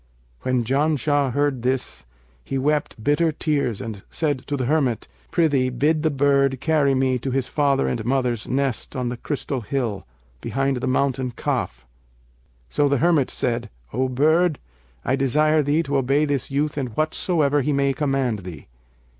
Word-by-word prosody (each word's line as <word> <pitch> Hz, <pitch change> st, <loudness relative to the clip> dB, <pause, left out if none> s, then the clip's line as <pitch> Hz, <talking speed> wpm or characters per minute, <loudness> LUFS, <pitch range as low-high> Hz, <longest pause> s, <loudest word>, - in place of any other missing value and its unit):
When 130 Hz, -2 st, 0 dB
Janshah 145 Hz, +1 st, +1 dB
heard 145 Hz, -3 st, 0 dB
this, 125 Hz, -, -2 dB, 0.4 s
he 135 Hz, -, -3 dB
wept 145 Hz, -4 st, -1 dB
bitter 150 Hz, +5 st, +2 dB
tears 140 Hz, -8 st, -1 dB
and 110 Hz, -5 st, -6 dB
said 145 Hz, -5 st, -2 dB
to 145 Hz, -, -1 dB
the 130 Hz, -, -1 dB
hermit, 135 Hz, -5 st, +1 dB, 0.2 s
'Prithee 145 Hz, -6 st, +2 dB
bid 150 Hz, +6 st, +1 dB
the 160 Hz, -, +2 dB
bird 140 Hz, -2 st, +2 dB
carry 145 Hz, -2 st, +2 dB
me 130 Hz, -1 st, +1 dB
to 135 Hz, -, -3 dB
his 130 Hz, 0 st, 0 dB
father 140 Hz, -2 st, +1 dB
and 115 Hz, -3 st, -2 dB
mother's 125 Hz, -2 st, 0 dB
nest 135 Hz, -2 st, -1 dB
on 125 Hz, -2 st, -1 dB
the 120 Hz, -, -4 dB
crystal 135 Hz, 0 st, -3 dB
hill, 115 Hz, -, -3 dB, 0.3 s
behind 135 Hz, +3 st, 0 dB
the 125 Hz, -, -3 dB
Mountain 130 Hz, -1 st, 0 dB
Kaf.' -, -, -2 dB, 0.8 s
So 145 Hz, -, +1 dB
the 140 Hz, -, +2 dB
hermit 155 Hz, -1 st, +3 dB
said, 120 Hz, -2 st, -2 dB, 0.2 s
'O 130 Hz, +2 st, 0 dB
bird, 155 Hz, +5 st, +3 dB, 0.5 s
I 130 Hz, -, +2 dB
desire 150 Hz, +3 st, +3 dB
thee 150 Hz, +3 st, +1 dB
to 140 Hz, -3 st, -1 dB
obey 135 Hz, +3 st, +2 dB
this 140 Hz, -3 st, -1 dB
youth 145 Hz, +1 st, -1 dB
in 135 Hz, -, -2 dB
whatsoever 150 Hz, -, +1 dB
he 150 Hz, -, 0 dB
may 140 Hz, -1 st, +2 dB
command 135 Hz, -5 st, 0 dB
thee.' 90 Hz, -6 st, -9 dB
135 Hz, 165 wpm, -23 LUFS, 125-145 Hz, 0.8 s, hermit